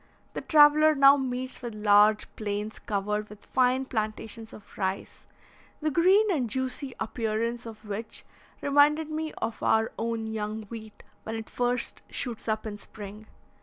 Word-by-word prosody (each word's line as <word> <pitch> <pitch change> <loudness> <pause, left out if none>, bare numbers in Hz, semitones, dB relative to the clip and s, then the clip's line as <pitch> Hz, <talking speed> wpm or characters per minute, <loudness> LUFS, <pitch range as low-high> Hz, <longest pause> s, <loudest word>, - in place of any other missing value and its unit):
The - - -4
traveller 305 0 +6
now 275 0 +8
meets 255 -1 -3
with 240 -3 -6
large 210 0 +5
plains 210 0 -4
covered 210 +1 -2
with 210 0 -13
fine 255 +1 +2
plantations 220 -1 -4
of 210 - -14
rice, 190 -1 -4 0.5
the 310 0 0
green 385 +7 +4
and 260 -9 0
juicy 260 +2 -3
appearance 230 +1 -2
of 220 -1 -11
which 210 +2 -6 0.4
reminded 295 +2 +3
me 310 0 -3
of 230 - -4
our 220 0 +2
own 225 0 -2
young 220 0 -4
wheat 220 -2 -9 0.2
when 225 - -5
it 225 0 -7
first 245 0 -1
shoots 235 -4 -5
up 220 0 -1
in 210 -1 -6
spring. 210 +1 -10
225 Hz, 150 wpm, -28 LUFS, 215-265 Hz, 0.5 s, now